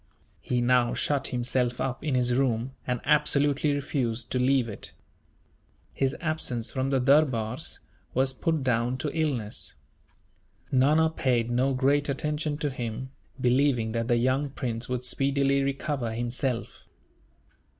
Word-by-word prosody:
He 125 -1 -1
now 120 0 +3
shut 140 -2 0
himself 125 -1 -1
up 130 +1 -2
in 150 -4 0
his 125 -1 +2
room, 125 -1 +1 0.2
and 125 -1 -1
absolutely 145 0 +2
refused 130 -5 -2
to 125 - 0
leave 130 -1 +3
it. 105 - -7 1.0
His 135 0 0
absence 155 -8 -2
from 130 0 -1
the 135 -1 +2
durbars 130 -4 +2 0.4
was 130 +1 +2
put 155 +2 -1
down 125 0 +1
to 145 +3 -3
illness. 135 -10 -2 1.0
Nana 150 +5 +4
paid 120 -6 0
no 130 +2 +2
great 140 +3 +2
attention 150 +2 -2
to 145 -1 -2
him, 125 +1 -5 0.3
believing 125 -2 +2
that 115 0 -2
the 120 -1 +3
young 130 +4 +1
prince 120 -3 -4
would 125 -1 -2
speedily 140 +1 +2
recover 135 -3 -2
himself. 120 +1 -3
130 Hz, 135 wpm, -27 LUFS, 120-140 Hz, 1.0 s, Nana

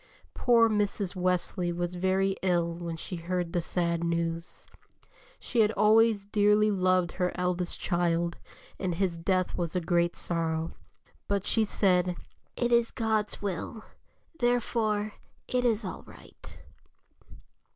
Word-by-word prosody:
Poor 235 -2 +4
Mrs. 205 -3 0
Wesley 180 0 0
was 175 +1 -3
very 190 +2 +1
ill 175 -2 +1
when 170 -1 -5
she 180 +2 -6
heard 175 0 -3
the 175 - +1
sad 170 0 -1
news. 170 0 -3 0.7
She 240 - -2
had 210 - +4
always 220 -1 +4
dearly 210 +1 +3
loved 185 -2 +2
her 180 -1 -1
eldest 180 -1 -1
child, 170 -1 0 0.4
and 180 -3 -1
his 185 -1 0
death 185 +1 0
was 170 0 -3
a - - +3
great 170 0 +1
sorrow. 165 -1 -2 0.6
But 200 -1 -1
she 225 - +2
said: 180 -3 +2 0.4
"It 240 0 0
is 235 -1 +4
God's 220 -3 -1
will, 200 +3 -4 0.6
therefore 220 -3 0 0.3
it 250 0 0
is 225 -3 +1
all 185 - -5
right." - - -14
185 Hz, 130 wpm, -28 LUFS, 170-210 Hz, 0.7 s, Poor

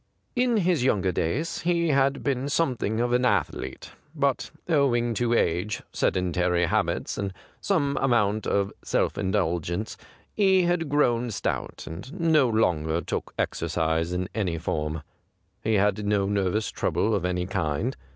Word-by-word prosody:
In 245 -2 +2
his 175 -8 +2
younger 100 -7 +2
days 115 - -1
he 170 -1 +1
had 140 -1 +2
been 135 -1 0
soinething 130 -7 0
of 120 0 +1
an 125 +1 +3
athlete, 125 - -1 0.2
but 140 -3 0 0.2
owing 125 -7 +2
to 120 +2 +1
age, 90 +2 0
sedentary 90 -1 +1
habits, - - -1
and 100 -1 -2 0.3
some 140 0 0
amount 110 -5 +2
of 100 0 0
self - - 0
indulgence, 90 0 -1 0.4
he 190 -3 +4
had 170 -3 0
grown 125 -5 +2
stout, 110 - -3
and 125 - -8
no 155 -6 +4
longer 85 -8 +1
took - - -4
exercise 80 +1 0
in 90 0 -1
any 95 -7 -1
form. 80 -1 -3 0.6
He 110 0 +2
had 105 +1 +2
no 100 -1 +1
nervous 100 +1 0
trouble 110 - 0
of 100 -4 0
any 90 0 -1
kind. 85 - -1
110 Hz, 140 wpm, -26 LUFS, 90-140 Hz, 0.6 s, he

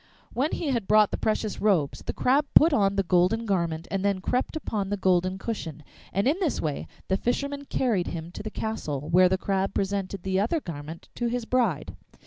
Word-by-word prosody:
When 275 +6 0
he 315 - -2
had 235 -7 -1
brought 215 -1 +5
the - - 0
precious 215 -1 -1
robes, 185 -9 +2
the - - -3
Crab 280 +3 +2
put 320 +1 +7
on 200 -5 +3
the 195 - +2
golden 185 +6 +2
garment 170 -5 -1
and 195 -1 -1
then 200 -2 +1
crept 250 - -1
upon 210 -10 -2
the 205 - -1
golden 185 0 +2
cushion, 165 - -5 0.3
and 200 +5 +1
in 310 +7 +2
this 345 -7 0
way 150 -3 -3 0.2
the 190 - +1
fisherman 280 +5 -2
carried 225 -10 0
him 165 0 -5
to - - -7
the 215 - -5
castle, 155 -11 -4
where 180 +2 +6
the 190 - +2
Crab 195 0 -1
presented 195 -1 -2
the 190 0 0
other 235 +11 +1
garment 160 - -8
to 240 - -2
his 240 0 -2
bride. 195 - 0
195 Hz, 205 wpm, -26 LUFS, 180-235 Hz, 0.3 s, put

